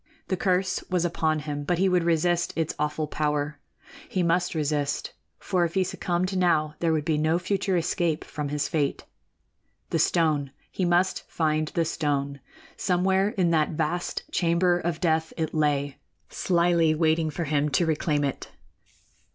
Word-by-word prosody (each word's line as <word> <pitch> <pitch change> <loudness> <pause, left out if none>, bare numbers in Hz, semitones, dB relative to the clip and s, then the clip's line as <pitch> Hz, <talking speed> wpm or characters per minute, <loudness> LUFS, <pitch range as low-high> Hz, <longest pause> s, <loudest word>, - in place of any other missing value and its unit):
The 190 - +1
curse 185 0 0
was 180 -2 +1
upon 160 -2 0
him, 145 -1 -4
but 175 +4 0
he 190 +2 +3
would 180 -2 +2
resist 170 +1 +1
its 165 -1 -1
awful 150 +1 -1
power. 150 0 -2 0.5
He 185 - 0
must 175 +1 +1
resist; 145 -2 -1 0.2
for 185 -3 0
if 170 +1 -2
he 190 - +3
succumbed 185 +1 -2
now, 160 -5 +2
there 165 -1 +1
would 155 -2 0
be 155 -2 +1
no 160 +2 +2
future 190 +1 0
escape 165 -1 0
from 150 -2 -5
his 145 -1 -1
fate. 145 -3 -1 0.9
The - - +1
stone 150 -5 +1 0.2
he 185 - -1
must 175 +2 +1
find 155 -1 0
the 165 +1 0
stone! 140 -3 -1 0.4
Somewhere 190 +2 +2
in 180 -5 +1
that 155 -1 +2
vast 175 +3 -2
chamber 175 +1 +2
of 170 -2 -2
death 160 -2 +1
it 160 -2 -2
lay, 145 -3 0 0.3
slyly 170 -3 +2
waiting 160 0 +2
for 170 +3 -3
him 150 -1 +1
to 150 +5 +2
reclaim 150 -2 0
it. 140 -2 -3
165 Hz, 160 wpm, -26 LUFS, 150-175 Hz, 0.9 s, he